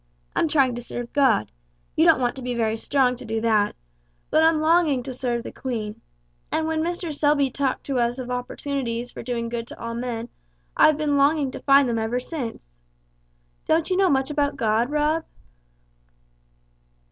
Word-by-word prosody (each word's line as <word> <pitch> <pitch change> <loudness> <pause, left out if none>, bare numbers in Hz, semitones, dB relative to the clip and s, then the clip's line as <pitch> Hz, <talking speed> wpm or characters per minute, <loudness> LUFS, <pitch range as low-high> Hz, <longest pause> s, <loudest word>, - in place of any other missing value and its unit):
I'm - - +2
trying 275 -5 +3
to 240 - -5
serve 240 0 -6
God 265 - +3 0.4
you - - +4
don't - - +6
want 245 -1 0
to - - -6
be 250 -1 -3
very 225 -2 0
strong 250 +2 +1
to 255 - -10
do 225 -1 -2
that; 215 -2 +2 0.6
but 315 - +4
I'm 320 -1 +4
longing 310 -5 +3
to 260 - -6
serve 245 -2 -2
the - - -7
Queen, 220 -5 -5 0.5
and 320 - 0
when 320 0 0
Mr. 345 -1 -3
Selby 290 -2 +2
talked 270 0 -1
to 270 -3 -1
us 240 +1 0
of 250 -1 -5
opportunities 245 -1 -3
for - - -8
doing 235 -1 -3
good 230 0 -4
to - - -11
all 230 0 -5
men 235 -1 -4 0.5
I've 310 -1 +5
been 295 -2 +1
longing 280 -1 +3
to - - -7
find 275 -1 +5
them 230 -1 0
ever 225 +3 -1
since. 230 - -7 0.9
Don't 325 +3 +2
you - - +3
know 380 0 +3
much 270 -1 +1
about 285 -1 0
God, 225 +2 +1
Rob?" 300 +2 +1
255 Hz, 180 wpm, -24 LUFS, 235-295 Hz, 0.9 s, don't